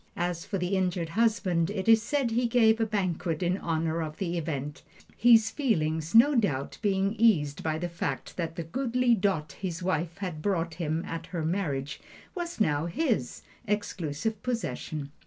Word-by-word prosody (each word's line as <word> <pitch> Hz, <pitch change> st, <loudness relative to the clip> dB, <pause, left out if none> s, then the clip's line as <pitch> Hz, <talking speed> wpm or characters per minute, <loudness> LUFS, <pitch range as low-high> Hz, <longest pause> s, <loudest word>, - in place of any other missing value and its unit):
As 175 Hz, -1 st, -2 dB
for 195 Hz, -, -2 dB
the 180 Hz, +2 st, -1 dB
injured 180 Hz, -3 st, 0 dB
husband, 190 Hz, -5 st, +1 dB
it 200 Hz, -1 st, -3 dB
is 225 Hz, -1 st, +7 dB
said 260 Hz, 0 st, 0 dB
he 240 Hz, +2 st, +1 dB
gave 225 Hz, -2 st, +4 dB
a 225 Hz, -, +2 dB
banquet 180 Hz, -5 st, -1 dB
in 180 Hz, +3 st, +1 dB
honor 165 Hz, 0 st, -1 dB
of 155 Hz, -1 st, -5 dB
the 175 Hz, -3 st, -2 dB
event; 150 Hz, -3 st, -4 dB, 0.3 s
his 225 Hz, -1 st, +5 dB
feelings, 160 Hz, -, 0 dB
no 250 Hz, +6 st, +7 dB
doubt, 170 Hz, -, 0 dB
being 195 Hz, -1 st, +1 dB
eased 160 Hz, -11 st, +3 dB
by 155 Hz, -1 st, -1 dB
the 175 Hz, +2 st, -2 dB
fact 165 Hz, -6 st, -4 dB
that 165 Hz, -2 st, -3 dB
the 170 Hz, -, -3 dB
goodly 250 Hz, -, +1 dB
dot 185 Hz, -7 st, 0 dB
his 180 Hz, -3 st, -5 dB
wife 170 Hz, -2 st, -1 dB
had 180 Hz, -6 st, -5 dB
brought 170 Hz, -3 st, 0 dB
him 165 Hz, 0 st, -2 dB
at 165 Hz, 0 st, -5 dB
her 165 Hz, -4 st, -3 dB
marriage 155 Hz, -5 st, -2 dB, 0.3 s
was 345 Hz, -, -5 dB
now 150 Hz, -5 st, +1 dB
his 230 Hz, -, -1 dB, 0.2 s
exclusive 205 Hz, -1 st, -2 dB
possession. 155 Hz, -, -3 dB
180 Hz, 170 wpm, -28 LUFS, 160-220 Hz, 0.3 s, is